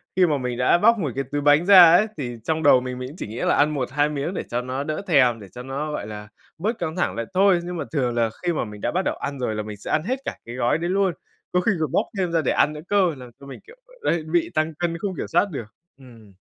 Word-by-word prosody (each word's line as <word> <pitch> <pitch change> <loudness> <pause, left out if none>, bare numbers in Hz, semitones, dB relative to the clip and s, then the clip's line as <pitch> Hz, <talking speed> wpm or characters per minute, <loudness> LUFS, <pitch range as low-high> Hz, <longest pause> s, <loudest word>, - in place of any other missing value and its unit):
khi 185 - +5
mà 150 -4 +1
mình 125 -2 -3
đã 125 +6 +4
bóc 230 +5 +4
một 150 -7 -2
cái 135 - -1
túi 145 0 -1
bánh 145 +4 +4
ra 185 -4 +9
ấy, 200 +6 +5
thì 120 -5 -5
trong 160 +4 -1
đầu 130 -3 +6
mình, 125 0 -5
mình 125 0 -5
cũng 150 - -12
chỉ - - -5
nghĩ 110 +3 -8
là - - +2
ăn 150 +1 +3
1-2 145 +2 0
miếng 150 +4 -3
để - - -3
cho 120 +1 -1
nó 130 +2 -4
đỡ 155 +4 -3
thèm, 125 -9 +4
để 100 - -11
cho 125 +7 -9
nó, 140 +4 -4
gọi 105 -8 -4
là, 105 -1 -8 0.3
bớt 215 +8 -2
căng 160 -2 -3
thẳng 185 - -1
lại 115 - -3
thôi. 190 -1 +4
Nhưng 175 0 -5
mà - - -2
thường 125 -6 -1
là 115 -1 +1
khi 175 -1 +1
mà 150 - -2
mình 105 -1 -10
đã - - -1
bắt 185 - 0
đầu - - 0
ăn 140 -1 -5
rồi 115 -4 -2
là 105 - -3
mình 105 -1 -8
sẽ - - -7
ăn 155 - +1
hết 255 +6 -2
cả - - -4
cái 120 - -8
gói 125 +2 +1
đấy 170 +2 -3
luôn. 190 -1 +1 0.4
Có 180 - +2
khi 225 - +2
còn 155 -4 -1
bóc - - +1
thêm 180 -3 -1
ra 165 -1 +2
để - - 0
ăn 150 - +2
nữa 150 - -8
cơ! 190 -6 +2
Làm 125 -1 -10
cho 140 - -13
mình, 140 - -9
kiểu, 465 - -14
ờ, - - -21 0.2
đấy, 165 -2 -1
bị 160 +2 0
tăng 155 +1 0
cân 170 -1 -1
không 190 +1 -4
kiểm - - -4
soát 175 +5 +2
được. 125 -6 -5 0.3
Ừm. 115 -6 -16
150 Hz, 305 wpm, -23 LUFS, 125-175 Hz, 0.4 s, ra